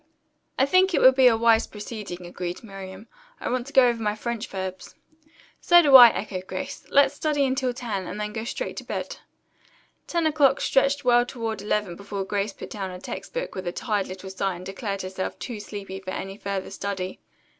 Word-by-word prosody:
"I 265 Hz, -, +4 dB
think 370 Hz, +4 st, +3 dB
it -, -, +2 dB
would 260 Hz, -, +8 dB
be 260 Hz, -1 st, +6 dB
a 230 Hz, -2 st, +5 dB
wise 230 Hz, 0 st, +4 dB
proceeding," 205 Hz, -4 st, -7 dB
agreed 175 Hz, +2 st, -6 dB
Miriam. 195 Hz, -1 st, -9 dB, 0.3 s
"I -, -, -3 dB
want 250 Hz, 0 st, -2 dB
to 280 Hz, -, -10 dB
go 260 Hz, -2 st, +7 dB
over 235 Hz, -1 st, 0 dB
my 210 Hz, -1 st, 0 dB
French 235 Hz, +1 st, -4 dB
verbs." 190 Hz, -1 st, -6 dB, 0.6 s
"So 345 Hz, 0 st, +6 dB
do 280 Hz, -3 st, +6 dB
I," 245 Hz, -2 st, +13 dB
echoed 190 Hz, -4 st, -5 dB
Grace. 280 Hz, 0 st, -6 dB
"Let's 280 Hz, 0 st, +4 dB
study 295 Hz, -3 st, 0 dB
until 260 Hz, -1 st, 0 dB
ten, 220 Hz, -7 st, -4 dB
and -, -, -6 dB
then 210 Hz, 0 st, -3 dB
go 220 Hz, 0 st, -4 dB
straight -, -, -4 dB
to -, -, -5 dB
bed." -, -, -5 dB, 0.9 s
Ten 340 Hz, -2 st, 0 dB
o'clock 295 Hz, -3 st, +3 dB
stretched 275 Hz, +1 st, +2 dB
well 240 Hz, -1 st, +5 dB
toward 225 Hz, -4 st, -4 dB
eleven 205 Hz, -3 st, -1 dB
before 200 Hz, +1 st, -5 dB
Grace 200 Hz, +1 st, -1 dB
put -, -, -10 dB
down 195 Hz, -3 st, -4 dB
her 180 Hz, -, -7 dB
text -, -, -7 dB
book -, -, -3 dB
with 185 Hz, -2 st, -6 dB
a -, -, 0 dB
tired 205 Hz, 0 st, -2 dB
little 190 Hz, +1 st, -8 dB
sigh 190 Hz, -1 st, -2 dB
and 180 Hz, +1 st, -10 dB
declared 195 Hz, 0 st, -4 dB
herself 185 Hz, 0 st, -4 dB
too 235 Hz, -4 st, -6 dB
sleepy 200 Hz, -2 st, -7 dB
for 185 Hz, -1 st, -6 dB, 0.3 s
further 195 Hz, -1 st, -4 dB
study. 190 Hz, -2 st, -4 dB
210 Hz, 200 wpm, -25 LUFS, 190-255 Hz, 0.9 s, I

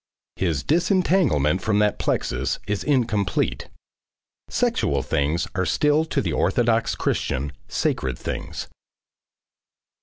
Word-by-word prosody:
His 80 Hz, -7 st, 0 dB
disentanglement 160 Hz, -, +2 dB
from 105 Hz, -2 st, +1 dB
that 105 Hz, 0 st, +2 dB
plexus 65 Hz, +1 st, -1 dB
is 105 Hz, 0 st, -2 dB
incomplete. 120 Hz, -8 st, 0 dB, 0.8 s
Sexual 70 Hz, -1 st, +1 dB
things 75 Hz, +4 st, 0 dB
are 95 Hz, -, 0 dB
still 150 Hz, -, +2 dB
to 150 Hz, -3 st, -1 dB
the -, -, -2 dB
orthodox 115 Hz, -2 st, +2 dB
Christian, 70 Hz, +2 st, -1 dB, 0.2 s
sacred 65 Hz, -2 st, -1 dB
things. -, -, -5 dB
105 Hz, 100 wpm, -23 LUFS, -, 0.8 s, disentanglement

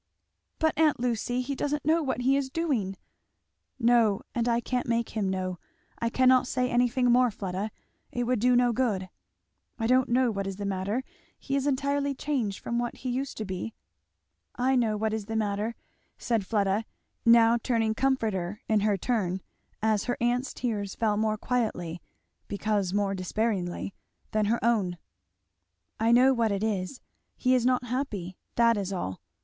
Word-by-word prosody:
"But, 315 Hz, -1 st, +2 dB
aunt 310 Hz, -5 st, +4 dB
Lucy, 245 Hz, +1 st, 0 dB
he 265 Hz, +3 st, -3 dB
doesn't 290 Hz, +1 st, -2 dB
know 320 Hz, +2 st, +3 dB
what 265 Hz, -4 st, -1 dB
he 265 Hz, +2 st, +3 dB
is 275 Hz, -1 st, 0 dB
doing!" 260 Hz, -, -1 dB, 0.8 s
"No 230 Hz, -4 st, +3 dB
and 240 Hz, 0 st, 0 dB
I 235 Hz, 0 st, +3 dB
can't 250 Hz, +1 st, -2 dB
make 235 Hz, 0 st, 0 dB
him 210 Hz, -3 st, -1 dB
know. 185 Hz, -1 st, -2 dB, 0.4 s
I 230 Hz, -, 0 dB
cannot 255 Hz, +1 st, +4 dB
say 250 Hz, 0 st, 0 dB
anything 245 Hz, 0 st, +3 dB
more, 250 Hz, 0 st, +5 dB
Fleda 195 Hz, 0 st, -4 dB, 0.4 s
it 245 Hz, -, -1 dB
would 245 Hz, -1 st, +1 dB
do 250 Hz, +3 st, +4 dB
no 245 Hz, -1 st, +4 dB
good. 210 Hz, -7 st, -1 dB, 0.7 s
I 225 Hz, -, -2 dB
don't 255 Hz, +2 st, +3 dB
know 245 Hz, 0 st, +3 dB
what 200 Hz, -2 st, -3 dB
is 195 Hz, -, -4 dB
the 205 Hz, +1 st, -5 dB
matter 200 Hz, +5 st, -1 dB, 0.3 s
he 275 Hz, -, -3 dB
is 275 Hz, 0 st, 0 dB
entirely 280 Hz, 0 st, 0 dB
changed 255 Hz, -9 st, -1 dB
from 235 Hz, 0 st, -2 dB
what 240 Hz, 0 st, -2 dB
he 255 Hz, -, -4 dB
used 265 Hz, +2 st, -3 dB
to 215 Hz, -, -3 dB
be 185 Hz, -, -5 dB, 0.4 s
" 80 Hz, +1 st, -49 dB, 0.2 s
"I -, -, +3 dB
know 225 Hz, -4 st, +2 dB
what 220 Hz, +1 st, -1 dB
is 215 Hz, -2 st, -3 dB
the 225 Hz, -, -3 dB
matter," 215 Hz, +1 st, -1 dB, 0.4 s
said 225 Hz, -5 st, -1 dB
Fleda, 205 Hz, 0 st, +1 dB, 0.4 s
now 230 Hz, 0 st, +6 dB
turning 225 Hz, -3 st, +1 dB
comforter 215 Hz, -7 st, -1 dB
in 215 Hz, -1 st, +3 dB
her 205 Hz, -1 st, +2 dB
turn 190 Hz, -4 st, -1 dB, 0.4 s
as 215 Hz, -2 st, +2 dB
her 245 Hz, -, -1 dB
aunt's 245 Hz, +2 st, 0 dB
tears 210 Hz, -5 st, -3 dB
fell 215 Hz, -2 st, +1 dB
more 215 Hz, 0 st, +1 dB
quietly, 205 Hz, -9 st, -2 dB, 0.5 s
because 205 Hz, -2 st, -1 dB
more 200 Hz, 0 st, +1 dB
despairingly, 190 Hz, -1 st, -2 dB, 0.4 s
than 215 Hz, -1 st, +1 dB
her 225 Hz, +3 st, +2 dB
own, 200 Hz, -7 st, +1 dB, 1.0 s
"I 225 Hz, +1 st, +3 dB
know 255 Hz, +3 st, +6 dB
what 230 Hz, -3 st, +1 dB
it 200 Hz, +1 st, -1 dB
is 210 Hz, +3 st, -2 dB, 0.4 s
he 255 Hz, 0 st, +2 dB
is 250 Hz, -1 st, +3 dB
not 250 Hz, -1 st, +2 dB
happy; 225 Hz, -8 st, -3 dB, 0.2 s
that 230 Hz, -1 st, +4 dB
is 195 Hz, -1 st, -2 dB
all. 95 Hz, -, -4 dB
230 Hz, 175 wpm, -28 LUFS, 200-250 Hz, 1.0 s, now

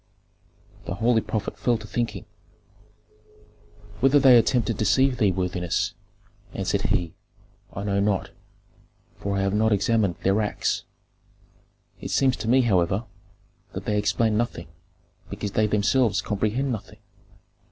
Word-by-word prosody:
The -, -, -4 dB
holy 115 Hz, +2 st, +2 dB
prophet 105 Hz, -1 st, -4 dB
fell 120 Hz, +2 st, +1 dB
to 110 Hz, -, -11 dB
thinking. 105 Hz, -3 st, -3 dB, 1.7 s
"Whether 135 Hz, +2 st, +4 dB
they 130 Hz, -2 st, +7 dB
attempt 120 Hz, 0 st, +3 dB
to 115 Hz, -, -1 dB
deceive 130 Hz, +4 st, +2 dB
thee, 105 Hz, -5 st, +3 dB
worthiness," 90 Hz, -1 st, -2 dB, 0.6 s
answered -, -, -1 dB
he, 85 Hz, -2 st, 0 dB, 0.6 s
"I 100 Hz, -, -6 dB
know 100 Hz, -1 st, 0 dB
not, 100 Hz, -1 st, 0 dB, 0.9 s
for 100 Hz, 0 st, -3 dB
I -, -, 0 dB
have 95 Hz, 0 st, 0 dB
not 110 Hz, +1 st, +2 dB
examined 105 Hz, -2 st, +1 dB
their 95 Hz, +3 st, +2 dB
acts. 105 Hz, -, -2 dB, 1.1 s
It -, -, -6 dB
seems 135 Hz, -2 st, +2 dB
to 110 Hz, -, -5 dB
me, 130 Hz, +3 st, +5 dB
however, 95 Hz, -2 st, +1 dB, 0.7 s
that -, -, -6 dB
they 105 Hz, -1 st, 0 dB
explain 110 Hz, +1 st, +1 dB
nothing, 110 Hz, -7 st, -2 dB, 0.6 s
because 100 Hz, 0 st, -5 dB
they 110 Hz, +2 st, +2 dB
themselves 105 Hz, +2 st, +2 dB
comprehend 110 Hz, +6 st, -1 dB
nothing. 110 Hz, -1 st, -6 dB
105 Hz, 130 wpm, -24 LUFS, 100-120 Hz, 1.7 s, they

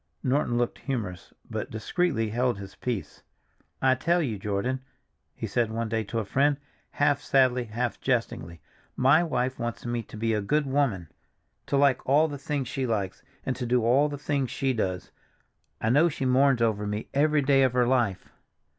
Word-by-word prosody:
Norton 130 Hz, -2 st, +1 dB
looked 120 Hz, 0 st, -1 dB
humorous, 105 Hz, -, -4 dB, 0.2 s
but -, -, -4 dB
discreetly 110 Hz, +1 st, -1 dB
held 120 Hz, 0 st, +1 dB
his 100 Hz, -1 st, -9 dB
peace. 120 Hz, -6 st, -4 dB, 0.6 s
"I 130 Hz, -1 st, +5 dB
tell 170 Hz, +7 st, +1 dB
you, 120 Hz, -, -2 dB
Jordan," 105 Hz, +6 st, -2 dB, 0.5 s
he -, -, -4 dB
said 120 Hz, -2 st, 0 dB
one 115 Hz, 0 st, -3 dB
day 110 Hz, 0 st, 0 dB
to 115 Hz, -, -4 dB
a 110 Hz, -, -1 dB
friend, 140 Hz, +7 st, +2 dB, 0.3 s
half 145 Hz, -1 st, +1 dB
sadly, 130 Hz, -3 st, +3 dB
half 120 Hz, +2 st, -3 dB
jestingly, 100 Hz, -, -2 dB, 0.3 s
"my 140 Hz, +6 st, +5 dB
wife 130 Hz, -5 st, -1 dB
wants 120 Hz, 0 st, -4 dB
me 120 Hz, 0 st, -1 dB
to 110 Hz, -, -11 dB
be 115 Hz, +1 st, 0 dB
a 105 Hz, -, 0 dB
good 150 Hz, +9 st, +1 dB
woman, 130 Hz, -, 0 dB, 0.6 s
to 140 Hz, -, +1 dB
like 140 Hz, -2 st, +3 dB
all 150 Hz, +4 st, +5 dB
the 145 Hz, -2 st, -6 dB
things 140 Hz, -2 st, -2 dB
she 130 Hz, 0 st, -2 dB
likes, 100 Hz, -5 st, -2 dB, 0.2 s
and 130 Hz, -, -1 dB
to 125 Hz, -2 st, -3 dB
do 120 Hz, -1 st, +2 dB
all 135 Hz, +6 st, +4 dB
the 145 Hz, -, -5 dB
things 140 Hz, -2 st, -1 dB
she 135 Hz, -1 st, 0 dB
does. 95 Hz, -6 st, -2 dB, 0.7 s
I 110 Hz, -, +1 dB
know 155 Hz, +6 st, +5 dB
she 135 Hz, -3 st, -4 dB
mourns 130 Hz, -1 st, +4 dB
over 105 Hz, -2 st, 0 dB
me 105 Hz, +1 st, -3 dB
every 150 Hz, +1 st, +3 dB
day 135 Hz, 0 st, +4 dB
of 130 Hz, -2 st, +3 dB
her 125 Hz, -1 st, +3 dB
life. 120 Hz, -7 st, +1 dB
125 Hz, 185 wpm, -27 LUFS, 110-140 Hz, 0.7 s, I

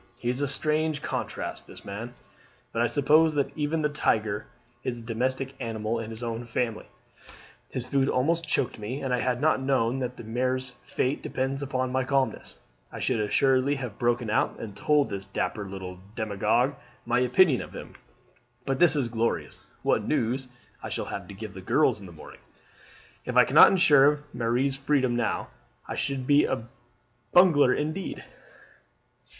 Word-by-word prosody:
He 120 Hz, -, 0 dB
is 125 Hz, +3 st, -2 dB
a 145 Hz, -, +1 dB
strange 155 Hz, +1 st, 0 dB
contrast, -, -, -4 dB
this -, -, -13 dB
man; 115 Hz, +5 st, -6 dB, 0.6 s
but 115 Hz, -, -1 dB
I 120 Hz, -, +3 dB
suppose 155 Hz, +4 st, +3 dB
that 140 Hz, -2 st, -1 dB
even 155 Hz, +1 st, -1 dB
the -, -, +4 dB
tiger 110 Hz, -7 st, 0 dB, 0.4 s
is 120 Hz, -2 st, -3 dB
a -, -, -9 dB
domestic 130 Hz, +3 st, -2 dB
animal 115 Hz, -2 st, -2 dB
in 110 Hz, -1 st, -5 dB
his 115 Hz, +1 st, -7 dB
own 115 Hz, 0 st, -4 dB
family. 115 Hz, -1 st, -2 dB, 0.8 s
His 125 Hz, -, -4 dB
food 135 Hz, +1 st, +1 dB
almost 165 Hz, +6 st, +1 dB
choked 125 Hz, -6 st, 0 dB
me, 115 Hz, +6 st, -4 dB
and 130 Hz, -2 st, -1 dB
had 125 Hz, 0 st, +1 dB
I -, -, -10 dB
not 150 Hz, -2 st, +2 dB
known 130 Hz, -2 st, +1 dB
that 125 Hz, -1 st, -4 dB
Marie's 125 Hz, +3 st, -2 dB
fate 130 Hz, +3 st, -1 dB
depends 135 Hz, +1 st, -2 dB
upon 130 Hz, -2 st, -2 dB
my 130 Hz, 0 st, +1 dB
calmness, 130 Hz, -, -1 dB, 0.3 s
I -, -, -7 dB
should 125 Hz, -3 st, 0 dB
assuredly 130 Hz, +6 st, +2 dB
have 125 Hz, -6 st, -6 dB
broken 120 Hz, -2 st, +1 dB
out -, -, +1 dB
and 105 Hz, -3 st, -7 dB
told 150 Hz, +3 st, +2 dB
this 100 Hz, -1 st, -5 dB
dapper 100 Hz, +1 st, -3 dB
little 95 Hz, -1 st, -7 dB, 0.2 s
demagogue 110 Hz, +5 st, +1 dB, 0.3 s
my 120 Hz, +1 st, +2 dB
opinion 125 Hz, +3 st, +4 dB
of -, -, -9 dB
him. -, -, -9 dB, 0.7 s
But 135 Hz, -1 st, -1 dB
this 170 Hz, -4 st, +5 dB
is 140 Hz, -5 st, +1 dB
glorious! 115 Hz, 0 st, -2 dB, 0.2 s
What -, -, +2 dB
news 125 Hz, +3 st, 0 dB, 0.3 s
I -, -, -6 dB
shall -, -, -3 dB
have -, -, -6 dB
to 100 Hz, -, -10 dB
give 105 Hz, 0 st, -8 dB
the 95 Hz, -, -9 dB
girls 125 Hz, +4 st, +2 dB
in 100 Hz, -, -10 dB
the -, -, -11 dB
morning! 80 Hz, -, -13 dB, 0.9 s
If -, -, -2 dB
I -, -, +8 dB
cannot -, -, +8 dB
ensure 150 Hz, -5 st, +5 dB
Marie's 120 Hz, +3 st, 0 dB
freedom 135 Hz, -2 st, +1 dB
now 115 Hz, -3 st, -1 dB, 0.4 s
I -, -, -4 dB
should 135 Hz, -2 st, -2 dB
be 145 Hz, +2 st, +5 dB
a 120 Hz, -3 st, -3 dB, 0.7 s
bungler 165 Hz, -8 st, +6 dB
indeed. 155 Hz, +8 st, -3 dB
130 Hz, 170 wpm, -27 LUFS, 115-140 Hz, 0.9 s, I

